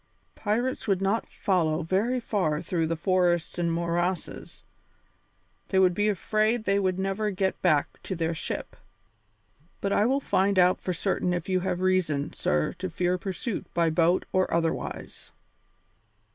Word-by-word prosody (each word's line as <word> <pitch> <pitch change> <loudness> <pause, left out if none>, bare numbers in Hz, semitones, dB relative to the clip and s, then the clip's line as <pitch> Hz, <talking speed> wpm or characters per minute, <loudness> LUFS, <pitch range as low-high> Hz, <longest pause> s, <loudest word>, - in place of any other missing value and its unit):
Pirates 230 +5 -1
would 195 -3 +2
not 195 +4 0
follow 170 -5 0
very 205 +9 +1
far 180 -10 0
through 165 -3 -1
those 165 0 -2
forests 175 -2 +1
and 170 -1 +1
morasses; 170 +2 -2 1.0
they 190 - 0
would 185 -1 +5
be 205 +3 +1
afraid 215 +3 +1
they 200 -1 +2
would 185 -2 0
never 195 +2 -1
get 190 -1 -1
back 155 -5 +1
to 190 - -4
their 165 0 -1
ship. 160 - -5 1.0
But 200 0 -1
I 210 - +3
will 270 +2 +2
find 200 -6 +1
out 180 0 +4
for 185 - -2
certain 180 0 0
if 175 - -4
you 185 -1 +2
have 180 -1 -2
reason, 165 -6 +1
sir, 75 0 0
to 185 0 -3
fear 180 +1 0
pursuit 195 +4 -4
by 170 -1 +3
boat 170 +3 +2
or 185 0 +2
otherwise." 165 -1 -3
185 Hz, 155 wpm, -27 LUFS, 170-200 Hz, 1.0 s, would